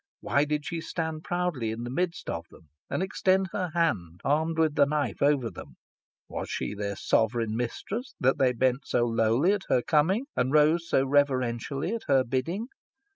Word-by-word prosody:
Why 140 Hz, +1 st, +2 dB
did 150 Hz, 0 st, -2 dB
she 170 Hz, -1 st, -3 dB
stand 160 Hz, -1 st, -4 dB
proudly 175 Hz, -10 st, -1 dB
in 110 Hz, +2 st, -4 dB
the 120 Hz, -, -5 dB
midst 175 Hz, +4 st, -2 dB
of -, -, -4 dB
them, 80 Hz, -, -18 dB, 0.2 s
and -, -, -1 dB
extend 190 Hz, 0 st, +1 dB
her 185 Hz, -3 st, -2 dB
hand, 90 Hz, -, 0 dB
armed 160 Hz, +3 st, +1 dB
with 160 Hz, -2 st, +3 dB
the 140 Hz, -1 st, +4 dB
knife, 150 Hz, 0 st, -1 dB
over 140 Hz, -5 st, +2 dB
them? 70 Hz, -3 st, -11 dB, 0.5 s
Was -, -, -5 dB
she -, -, -3 dB
their 100 Hz, -1 st, -3 dB
sovereign 110 Hz, +1 st, +1 dB
mistress, 200 Hz, -, -4 dB
that 130 Hz, +1 st, +2 dB
they 130 Hz, -2 st, +3 dB
bent 130 Hz, +3 st, 0 dB
so 120 Hz, -, +2 dB
lowly 115 Hz, -, +2 dB
at 205 Hz, -2 st, -3 dB
her 125 Hz, -, +3 dB
coming, 175 Hz, -, +2 dB
and 130 Hz, +1 st, +1 dB
rose 155 Hz, +3 st, +4 dB
so 135 Hz, -, +3 dB
reverentially 135 Hz, -, 0 dB
at 230 Hz, -, -4 dB
her 135 Hz, -2 st, +4 dB
bidding? 165 Hz, -, -2 dB
145 Hz, 180 wpm, -27 LUFS, 120-170 Hz, 0.5 s, the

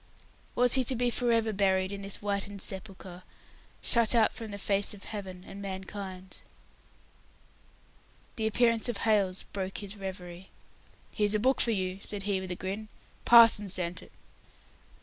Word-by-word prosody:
Was 245 Hz, 0 st, +3 dB
he 265 Hz, -, +5 dB
to 260 Hz, -, -1 dB
be 245 Hz, 0 st, +1 dB
for 240 Hz, 0 st, +1 dB
ever 225 Hz, -1 st, +2 dB
buried 190 Hz, -1 st, +2 dB
in 200 Hz, 0 st, -5 dB
this 195 Hz, 0 st, 0 dB
whitened 200 Hz, 0 st, -3 dB
sepulchre, 190 Hz, -2 st, -4 dB, 0.6 s
shut 235 Hz, 0 st, +4 dB
out 225 Hz, -2 st, +4 dB
from 225 Hz, -1 st, -7 dB
the 200 Hz, -, -6 dB
face 200 Hz, +1 st, 0 dB
of 200 Hz, -, -12 dB
Heaven 190 Hz, -4 st, -7 dB
and 200 Hz, -, -9 dB
mankind! 190 Hz, -1 st, -6 dB, 1.9 s
The 220 Hz, -1 st, 0 dB
appearance 230 Hz, +1 st, +2 dB
of 240 Hz, -, -2 dB
Hailes 200 Hz, -4 st, +2 dB
broke 190 Hz, -1 st, -3 dB
his 205 Hz, 0 st, -5 dB
reverie. 185 Hz, -2 st, -8 dB, 0.6 s
"Here's 210 Hz, -1 st, +1 dB
a -, -, +2 dB
book 260 Hz, +4 st, +3 dB
for -, -, +2 dB
you," 190 Hz, -3 st, -1 dB
said 205 Hz, -1 st, -4 dB
he, 200 Hz, -2 st, 0 dB
with 190 Hz, -, -6 dB
a 180 Hz, -, -2 dB
grin. 195 Hz, +4 st, -5 dB, 0.4 s
"Parson 230 Hz, -4 st, +7 dB
sent 180 Hz, -1 st, -4 dB
it." -, -, -15 dB
200 Hz, 160 wpm, -29 LUFS, 190-220 Hz, 1.9 s, Parson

